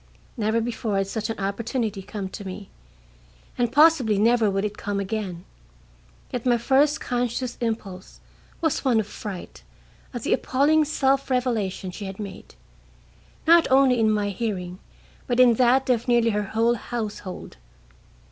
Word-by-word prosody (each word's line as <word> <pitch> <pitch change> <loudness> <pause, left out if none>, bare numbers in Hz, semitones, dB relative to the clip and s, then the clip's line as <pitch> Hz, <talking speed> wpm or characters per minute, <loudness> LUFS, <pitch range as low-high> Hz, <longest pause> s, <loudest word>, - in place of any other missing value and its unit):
Never 220 +1 0
before 225 -3 -2
had 195 - +1
such 215 +3 -4
an 225 - -3
opportunity 215 +1 -2
come 200 0 -6
to 205 - -8
me, 190 +1 -8 0.8
and 240 -1 0
possibly 280 -7 +4
never 225 +1 +3
would 195 +1 -1
it 210 0 -4
come 205 -1 -3
again, 195 -3 -4 0.9
yet 245 - -3
my 245 -2 +3
first 275 +5 +2
conscious 245 0 -2
impulse 205 -5 -4 0.4
was 320 -4 0
one 250 -5 +3
of 215 - -1
fright 200 -2 -8 0.5
at 240 -3 -6
the - - +1
appalling 295 +5 +2
self 275 -2 +1
revelation 225 -8 -1
she 200 +3 -7
had 195 +1 -7
made, 200 - -9 0.9
not 335 +1 +6
only 260 -2 +4
in 220 -1 +3
my 210 -1 +1
hearing, 185 -4 -4 0.5
but 245 0 0
in 250 -2 +7
that 255 +3 +3
of 245 -1 +1
nearly 235 -1 +3
her 210 0 -1
whole 230 +1 +4
household. 215 - -6
225 Hz, 150 wpm, -24 LUFS, 205-250 Hz, 0.9 s, in